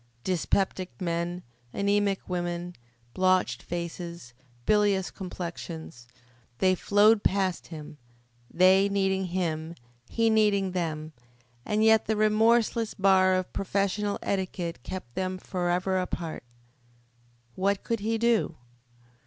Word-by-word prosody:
Dyspeptic 185 +1 -1
men, 175 0 -2 0.3
anemic 200 -1 0
women, 175 -1 -3 0.4
blotched 185 0 +2
faces, 170 -5 -6 0.3
bilious 200 -4 +2
complexions 170 - -7 0.5
they 185 +5 +3
flowed 205 +3 +4
past 190 -2 0
him, 150 -2 -9 0.5
they 190 +2 +5
needing 190 -1 +1
him, 170 -2 -2 0.3
he 230 -1 +2
needing 205 -3 +3
them, 155 -3 -3 0.5
and 210 +1 +1
yet 220 0 +5
the 220 - +1
remorseless 220 +1 +2
bar 190 -1 +4
of 185 0 -3
professional 200 +1 -1
etiquette 185 -3 -3
kept 180 -11 -7
them 185 +3 -2
forever 180 +1 -1
apart. 170 -5 -4 1.1
What 200 +4 0
could 230 -1 -1
he 225 +2 -1
do? 230 -7 +1
185 Hz, 105 wpm, -27 LUFS, 175-205 Hz, 1.1 s, they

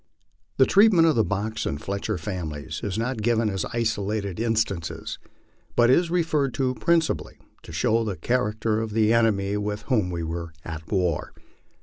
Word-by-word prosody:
The - - +6
treatment 200 -5 +5
of 160 - +3
the 115 - +4
Box 105 +2 -2
and 70 - -2
Fletcher 100 +2 -3
families 80 -4 -5
is 100 0 -2
not 115 0 -2
given 115 -1 +2
as 95 -1 -2
isolated 105 -4 -2
in 115 0 +1
stances, 100 -7 -2 0.6
but 120 +1 +5
is 170 +5 +3
referred 160 -6 +1
to 130 -2 +1
principally 160 - 0 0.2
to - - -12
show 115 +8 +1
the 105 -4 -3
character 110 -2 0
of 110 -1 -4
the 110 0 +3
enemy 105 -3 +2
with 105 0 -3
whom 110 -9 +1
we 85 -2 -3
were 85 0 -5
at 80 -1 -7
war. 90 -5 0
110 Hz, 165 wpm, -25 LUFS, 95-120 Hz, 0.6 s, The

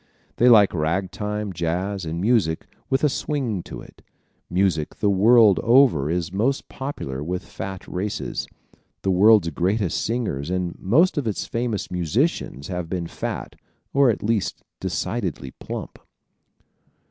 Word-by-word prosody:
They 125 - +5
like 105 -4 +6
ragtime, 95 +5 -2
jazz 90 +3 -2
and 80 +1 -3
music 100 -6 +1 0.2
with 135 +2 +1
a - - +6
swing 130 - -2
to - - -9
it. - - -16 0.5
Music 90 -4 0
the 105 - +1
world 105 0 +6
over 115 - +4
is 85 +1 -2
most 125 +8 0
popular 75 - -5
with 90 +3 -4
fat 95 -1 -7
races. 100 +3 -3 0.6
The 95 - +2
world's 100 -2 +5
greatest 95 +4 0
singers 105 - -2
and 90 -1 -2
most 150 - +3
of 130 - -3
its 105 - -2
famous 115 -4 -3
musicians 90 - -1
have 90 -3 -4
been 90 -2 -2
fat - - -5 0.4
or 140 -2 +5
at 110 - -1
least 105 -3 -1 0.2
decidedly 65 - -3
plump. - - -7
95 Hz, 135 wpm, -23 LUFS, 85-115 Hz, 0.6 s, like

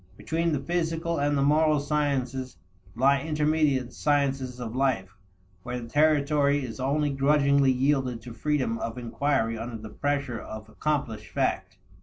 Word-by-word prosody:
Between 165 +1 -1
the 145 - 0
physical 165 +2 -1
and 145 0 +1
the 140 - +2
moral 155 +1 +3
sciences, 140 -3 -1 0.4
lie 135 +2 +3
intermediate 150 -4 +1
sciences 135 -4 0
of 120 -1 -5
life, 115 -8 0 0.5
where 125 +4 -4
the 115 - -8
territory 145 -1 +2
is 120 +1 -8
only 145 +3 +1
grudgingly 140 0 +3
yielded 130 -2 +1
to 120 - -8
freedom 130 -2 -1
of 115 +1 -4
inquiry 120 -1 -1
under 115 0 -5
the 110 0 -9
pressure 140 -4 -2
of 110 0 -8
accomplished 120 -5 -2
fact. - - -1
140 Hz, 145 wpm, -27 LUFS, 125-150 Hz, 0.5 s, moral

